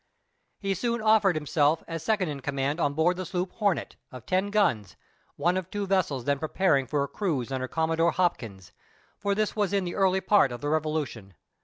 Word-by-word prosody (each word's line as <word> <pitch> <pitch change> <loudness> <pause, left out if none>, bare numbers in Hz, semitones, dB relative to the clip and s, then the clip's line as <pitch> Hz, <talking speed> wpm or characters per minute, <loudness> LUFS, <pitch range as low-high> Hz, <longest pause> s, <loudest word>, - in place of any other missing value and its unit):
He 195 -1 -1
soon 235 +5 -1
offered 215 -4 +4
himself 150 0 +1
as 165 -1 -5
second 200 +1 0
in 145 -2 -5
command 140 +3 -2
on 145 -3 0
board 175 +3 +2
the 185 - -4
sloop 180 +1 -2
Hornet, 200 -5 -1
of 125 -3 -10
ten 190 +2 0
guns, 170 - +1 0.4
one 175 +5 +1
of 185 -1 -4
two 205 0 -3
vessels 175 -10 0
then 140 -1 +1
preparing 155 -4 +1
for 145 +2 0
a - - -3
cruise 140 - -2
under 130 -1 -2
Commodore 165 +3 +1
Hopkins, 115 - -2 0.5
for 200 -1 0
this 215 0 -1
was 205 -3 0
in 200 -1 +2
the 175 - -4
early 190 -1 +2
part 195 -11 +4
of 120 - -6
the 145 - -2
revolution. 150 - -2
165 Hz, 195 wpm, -27 LUFS, 140-195 Hz, 0.5 s, offered